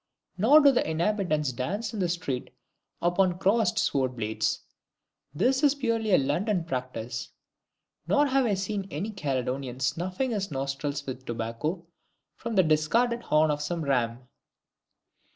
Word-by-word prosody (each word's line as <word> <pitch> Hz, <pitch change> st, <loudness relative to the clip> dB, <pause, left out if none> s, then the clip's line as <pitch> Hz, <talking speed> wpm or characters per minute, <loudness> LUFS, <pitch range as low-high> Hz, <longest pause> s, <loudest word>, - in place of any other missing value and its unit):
Nor 265 Hz, +11 st, +6 dB
do 280 Hz, -1 st, +7 dB
the 245 Hz, -, 0 dB
inhabitants 160 Hz, -4 st, 0 dB
dance 200 Hz, -, -3 dB
in 215 Hz, -, -4 dB
the 180 Hz, -2 st, +1 dB
street 170 Hz, -7 st, -3 dB, 0.5 s
upon 175 Hz, +1 st, +2 dB
crossed 195 Hz, 0 st, +2 dB
sword 130 Hz, -2 st, +1 dB
blades 110 Hz, -1 st, -1 dB, 0.7 s
this 260 Hz, -, +1 dB
is 290 Hz, -2 st, +4 dB
purely 230 Hz, -5 st, 0 dB
a -, -, +7 dB
London 175 Hz, +8 st, 0 dB
practice. 125 Hz, -6 st, -4 dB, 0.8 s
Nor 290 Hz, 0 st, +4 dB
have 270 Hz, -2 st, +2 dB
I 205 Hz, -, +2 dB
seen 195 Hz, 0 st, -3 dB
any 190 Hz, +9 st, -4 dB
Caledonian 130 Hz, -, -3 dB
snuffing 185 Hz, -, -1 dB
his 200 Hz, -3 st, -2 dB
nostrils 140 Hz, +1 st, -3 dB
with 130 Hz, -1 st, -6 dB
tobacco 120 Hz, +10 st, -3 dB, 0.5 s
from 230 Hz, -1 st, -5 dB
the 190 Hz, -, +6 dB
discarded 225 Hz, +11 st, +2 dB
horn 155 Hz, -6 st, +3 dB
of 150 Hz, 0 st, -2 dB
some 165 Hz, +2 st, -2 dB
ram. 125 Hz, -2 st, 0 dB
170 Hz, 140 wpm, -27 LUFS, 135-215 Hz, 0.8 s, do